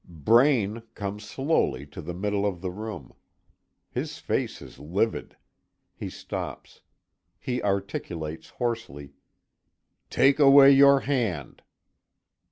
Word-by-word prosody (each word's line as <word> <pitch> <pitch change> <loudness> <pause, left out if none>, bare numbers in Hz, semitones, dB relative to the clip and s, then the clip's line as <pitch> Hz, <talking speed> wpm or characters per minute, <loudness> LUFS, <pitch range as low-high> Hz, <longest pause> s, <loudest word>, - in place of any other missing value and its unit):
Braine 115 - +2
comes 105 +1 -5
slowly 135 - 0
to 75 +5 -10
the 85 +2 -6
middle 100 +2 -1
of 95 -4 -2
the 95 -1 -3
room. 110 +3 -8 0.8
His - - -4
face - - -2
is - - -13
livid. 95 +9 -2 0.6
He - - -6
stops. - - -7 0.6
He 125 -1 -3
articulates 85 -5 -3
hoarsely: 95 - -4 1.0
"Take 135 +3 +3
away 140 -1 +8
your 140 0 +6
hand!" 115 - -2
105 Hz, 105 wpm, -26 LUFS, 85-130 Hz, 1.0 s, away